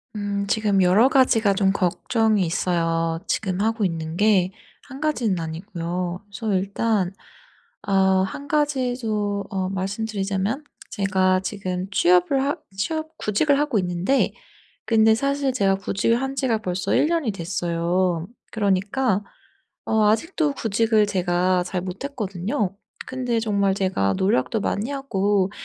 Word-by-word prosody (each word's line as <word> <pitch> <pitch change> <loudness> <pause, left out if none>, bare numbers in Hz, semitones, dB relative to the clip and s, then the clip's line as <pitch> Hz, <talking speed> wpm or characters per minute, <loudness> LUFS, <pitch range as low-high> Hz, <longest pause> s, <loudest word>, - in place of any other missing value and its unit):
음 200 -1 -2
지금 205 -2 +2
여러 200 +8 +5
가지가 230 -7 +4
좀 195 -1 +3
걱정이 210 +2 +1
있어요. 165 -1 0
지금 190 -3 -1
하고 225 0 0
있는 165 -2 -3
게 195 -3 +3 0.4
1 270 +2 -10
가지는 235 - 0
아니고요. 175 +2 -4
우선 200 +1 -3
일단 195 0 0 0.8
어 190 -1 +3
1 285 +8 -6
가지도 245 -9 0
어 190 -2 -2
말씀드리자면 200 +4 -2 0.3
제가 190 -2 +2
지금 185 -2 -4
취업을 180 +8 +3
하 285 - 0 0.2
취업 315 +8 -3
구직을 275 +8 +2
하고 285 -8 +1
있는데 180 +9 +1 0.6
근데 220 -1 +5
사실 275 +1 0
제가 195 -5 +2
구직을 200 +4 0
한 270 0 -3
지가 250 -5 +1
벌써 185 -2 -1
1 - - +4
년이 325 -9 0
됐어요. 170 0 -1 0.2
그러니까 205 +1 +1 0.6
어 220 -1 +2
아직도 300 - +1
구직을 220 -2 +2
제가 180 -1 +1
잘 180 -1 -3
못 185 +6 -6
했거든요. 200 -4 -3 0.3
근데 250 -3 -1
정말 200 -3 +1
제가 185 - 0
노력도 190 - +1
많이 210 +6 -1
하고 205 -8 0
200 Hz, 265 characters per minute, -23 LUFS, 185-230 Hz, 0.8 s, 여러